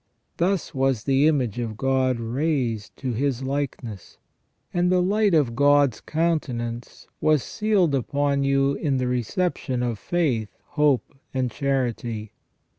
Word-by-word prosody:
Thus 180 0 0
was 135 -5 +1
the 135 +3 +3
image 130 -8 +1
of 110 -3 -4
God 130 -1 +1
raised 120 -3 -2
to 130 -2 -3
His 135 +1 -1
likeness, 130 -7 -4 0.6
and 180 0 +2
the 185 - +4
light 200 +1 +2
of 130 -7 +2
God's 145 -2 +4
countenance 125 -8 -2
was 155 -3 +3
sealed 205 -8 +1
upon 140 +1 0
you 140 0 +2
in 140 -1 -1
the 130 - 0
reception 125 - -1
of 120 -4 -2
faith, 130 -12 0 0.2
hope, 150 -4 +1 0.2
and 130 -2 0
charity. 120 -6 -2
135 Hz, 130 wpm, -24 LUFS, 120-150 Hz, 0.6 s, the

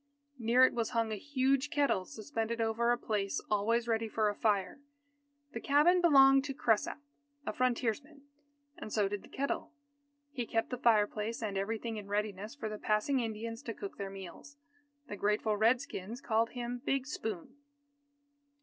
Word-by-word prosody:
Near 240 +3 +5
it - - +1
was 230 -2 -1
hung 225 -1 +1
a - - -1
huge 270 +3 0
kettle 280 -11 +1
suspended 225 +2 -4
over 230 +1 +1
a 240 - +2
place 205 -4 -1
always 225 +3 +1
ready 225 -1 0
for 215 -1 +1
a - - -2
fire. 200 0 0 0.7
The - - -5
cabin 310 +6 +4
belonged 270 -5 +7
to 275 -2 -4
Cresap, 225 -5 +1 0.5
a - - -2
frontiersman, 255 +4 -1 0.6
and 215 - -7
so 205 -2 +2
did 200 0 -4
the - - -15
kettle. 280 +4 -3 0.6
He 245 -5 -4
kept 225 +2 -1
the 250 - -2
fireplace 220 -1 +2
and 205 -2 -2
everything 220 +3 -2
in 205 -1 -7
readiness 210 +2 -3
for 250 -6 -4
the 215 -1 -5
passing 215 +6 +1
Indians 230 0 -4
to 230 -6 -6
cook 200 - -7
their 200 -1 -3
meals. 195 - -10 0.5
The 205 - -5
grateful 210 +1 +1
Red 225 +4 +4
Skins 230 -4 -7
called 230 -3 +1
him 245 0 -4
"Big 270 -2 0
Spoon." 225 - -5
230 Hz, 165 wpm, -32 LUFS, 210-260 Hz, 0.7 s, belonged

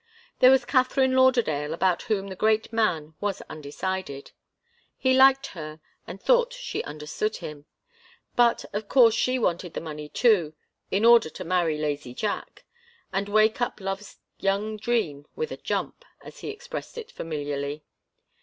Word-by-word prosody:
There 255 - +8
was 265 -1 +4
Katharine 260 0 +2
Lauderdale, 225 - +2
about 180 0 +1
whom 210 -4 -1
the 190 - -6
great 220 +3 +1
man 170 -9 0
was 205 -2 -2
undecided. 150 0 -5 0.7
He 260 0 +2
liked 270 +1 +6
her 155 -3 -8 0.3
and 195 - -8
thought - - +3
she - - -4
understood 150 +8 -3
him. 150 -1 -9 0.7
But 240 -1 +3
of 205 0 -4
course 235 -4 +6
she 255 +3 +1
wanted 180 -6 -1
the - - -1
money 150 -2 -7
too 175 - +2 0.3
in 200 +4 +1
order 235 -7 +7
to - - -8
marry 165 -3 +1
lazy 145 -4 -3
Jack 210 +7 -4 0.5
and 200 +1 -1
wake 215 +3 +3
up 240 - -1
love's 195 +1 -5 0.2
young 200 +2 0
dream 210 -11 -1
with 465 0 -3
a - - -5
jump, - - -3 0.2
as - - -12
he - - -6
expressed 475 +2 -7
it 470 0 -7
familiarly. 145 -1 -4
200 Hz, 155 wpm, -26 LUFS, 155-240 Hz, 0.7 s, There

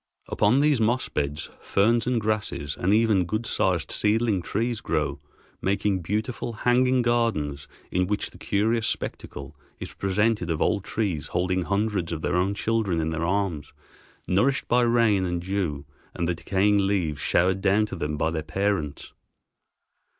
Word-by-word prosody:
Upon 115 +6 +3
these 145 -5 +3
moss 120 +4 +1
beds 75 0 -3
ferns 115 +4 +2
and 125 -2 +2
grasses 105 -9 -2
and 95 - 0
even 110 -3 +4
good 110 +6 -3
sized - - 0
seedling 105 -2 +2
trees 115 +6 -2
grow, 75 -3 -1 0.4
making 100 0 0
beautiful 110 +6 -3
hanging 125 +3 +2
gardens 95 - 0 0.2
in 90 0 +1
which 105 +1 -2
the - - -16
curious 110 +3 +1
spectacle 75 -7 -4 0.2
is - - -7
presented 105 -1 0
of 80 -2 -1
old 100 -3 +1
trees 95 -10 -2
holding 90 0 0
hundreds 100 -3 -1
of 80 -1 -4
their - - 0
own 95 +3 +1
children 105 -6 0
in 80 0 -1
their 85 +1 -2
arms, 95 -6 -2 0.5
nourished 125 +9 +1
by 125 +1 +3
rain 115 -5 +3
and 90 -1 -2
dew 90 -7 -2 0.3
and 85 - -1
the 90 - +1
decaying 100 +3 +1
leaves 85 -8 0
showered 95 +2 +2
down 100 +2 +3
to 105 - -6
them 75 -3 -3
by 80 +2 0
their 80 -1 -2
parents. 85 -2 -2
100 Hz, 155 wpm, -25 LUFS, 85-110 Hz, 0.5 s, even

